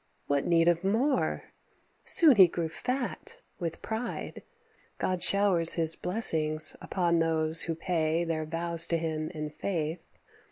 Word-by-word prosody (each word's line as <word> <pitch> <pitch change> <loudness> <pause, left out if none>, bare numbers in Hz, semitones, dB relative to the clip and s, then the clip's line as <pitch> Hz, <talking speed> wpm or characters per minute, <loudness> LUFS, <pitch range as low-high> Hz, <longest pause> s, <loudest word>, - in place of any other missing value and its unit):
What 140 -1 -2
need 165 -1 +1
of 170 0 0
more? 245 +8 -2 0.6
Soon 305 -9 +6
he 190 -2 +7
grew 170 -1 -5
fat 265 - -5 0.2
with 165 -3 -7
pride; 225 +2 -7 0.6
God 185 -1 -3
showers 195 -5 +4
his 165 -1 +3
blessings 155 -6 +3
upon 170 -3 -2
those 160 0 +2
who 165 - -2
pay 165 -1 -2
Their 160 -2 -4
vows 170 +1 0
to 170 - -1
him 155 -1 -5
in 150 -1 -8
faith. 160 0 -5
170 Hz, 135 wpm, -27 LUFS, 160-190 Hz, 0.6 s, he